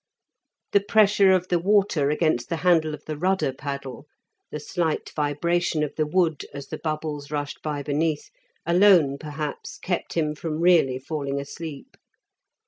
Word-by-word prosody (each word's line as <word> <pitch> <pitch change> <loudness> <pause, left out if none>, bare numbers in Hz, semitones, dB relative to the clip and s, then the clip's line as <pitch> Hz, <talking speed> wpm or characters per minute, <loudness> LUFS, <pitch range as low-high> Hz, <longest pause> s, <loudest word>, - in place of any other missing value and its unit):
The 200 - +5
pressure 200 -1 +4
of 185 -1 +1
the 175 - +2
water 190 -6 +2
against 150 -6 0
the - - 0
handle 160 -4 +3
of 150 - -19
the 155 - -4
rudder 185 -3 0
paddle, 140 0 -6 0.4
the 150 - -5
slight 160 +1 -2
vibration 155 +2 0
of 150 - -3
the 155 -1 0
wood, 165 -2 +1
as 140 -1 -8
the 155 - -5
bubbles 155 -2 -4
rushed 145 -1 -4
by 150 -2 -3
beneath, 150 +1 -1 0.3
alone 170 -5 +5
perhaps 150 -1 -6
kept 180 -2 -3
him 155 -2 0
from 155 0 -4
really 165 -7 +4
falling 140 0 -3
asleep. 155 - -8
155 Hz, 150 wpm, -24 LUFS, 145-175 Hz, 0.4 s, The